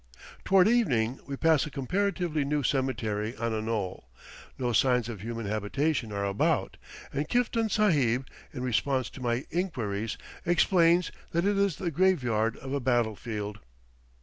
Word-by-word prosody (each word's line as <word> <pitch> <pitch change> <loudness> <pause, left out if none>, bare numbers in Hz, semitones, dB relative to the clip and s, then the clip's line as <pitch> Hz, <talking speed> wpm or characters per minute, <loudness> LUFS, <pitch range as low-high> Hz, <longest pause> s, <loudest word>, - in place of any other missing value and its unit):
Toward 190 0 +5
evening 135 - +2
we 140 -1 -4
pass 160 -1 +3
a - - -5
comparatively 170 +2 -1
new 145 +1 0
cemetery 115 -5 -1
on 115 0 -1
a 110 - -1
knoll; 100 - -3 0.5
no 125 -2 -1
signs 125 -1 +3
of 110 -5 -6
human 115 +1 -4
habitation 110 +5 -1
are 100 0 -2
about, 100 0 0 0.4
and 145 +2 -2
Kiftan 230 -2 +1
Sahib, 140 - +2 0.3
in 125 -3 -5
response 130 +1 0
to 130 - -10
my 120 +1 -1
inquiries, 115 - -2 0.3
explains 175 0 +3 0.2
that 170 +2 +1
it 205 0 +2
is 200 -4 +2
the 175 0 -3
graveyard 125 - +2
of 135 +1 -6
a 140 - +1
battle 120 -4 +1
field. 105 -2 -5
130 Hz, 150 wpm, -28 LUFS, 115-170 Hz, 0.5 s, Toward